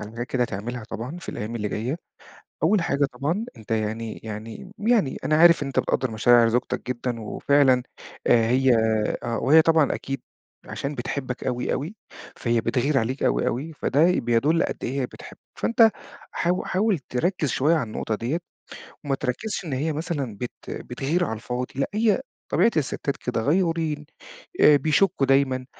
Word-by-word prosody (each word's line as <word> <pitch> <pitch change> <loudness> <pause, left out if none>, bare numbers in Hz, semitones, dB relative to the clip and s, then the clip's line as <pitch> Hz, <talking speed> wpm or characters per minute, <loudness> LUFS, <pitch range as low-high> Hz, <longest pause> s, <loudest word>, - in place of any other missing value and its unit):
على 105 - -7
حاجات 120 +2 -5
كده 125 -1 0
تعملها 115 +3 -5
طبعًا 130 +11 -6
في - - -12
الأيام 110 +3 -4
اللي 105 -2 -2
جاية. 120 +9 -2 0.7
أول 185 +4 +3
حاجة 140 -3 +1
طبعًا 150 - -1
أنت 110 -1 -15
يعني 110 0 -2
يعني 110 - -8
يعني 215 - +2
أنا 155 - +2
عارف 170 -1 +6
إن - - -2
أنت 135 - -2
بتقدَّر 130 -1 0
مشاعر 115 +2 +5
زوجتك 120 +2 -1
جدًا 120 -1 -3
وفعلًا 130 +3 +3 0.4
آآ 115 -1 +4
هي 130 +1 +4 0.5
آه. 115 -1 -2
وهي 160 +4 +6
طبعًا 160 -2 +3
أكيد 135 -1 -4 0.5
عشان 140 +2 -4
بتحبك 125 0 -4
أوي، 125 -1 -1
أوي، 155 +10 -3 0.4
فهي 120 -1 +1
بتغِير 130 +5 +1
عليك 130 +3 -2
أوي، 130 - +2
أوي، 145 +7 -2
فده 150 0 +2
بيدُل 145 +4 +2
قد - - -2
إيه 135 +3 -2
هي 130 - 0
بتحب. - - -12 0.2
فأنت 230 -1 +5 0.4
حاو 175 +2 0
حاول 200 0 +1
تركّز 150 +5 -1
شوية 145 +6 +2
على 160 - +1
النقطة 110 -1 -3
ديّة 120 +9 -2 0.7
وما 140 -2 0
تركّزش 180 - -3
إن 155 - -4
هي 150 +5 -1
مثلًا 145 - -3
بت 120 +3 -4 0.2
بتغِير 140 +8 -2
على - - -3
الفاضي، 125 +4 -4
لأ 135 - 0
هي 220 +2 +2 0.3
طبيعة 230 - +4
السِتّات 140 -1 -1
كده 120 -2 -2
غيورين، 160 0 0 0.6
آآ 150 - +8
بيشكُّوا 150 +1 +2
دايمًا، 130 -1 +2
135 Hz, 165 wpm, -24 LUFS, 120-160 Hz, 0.7 s, آآ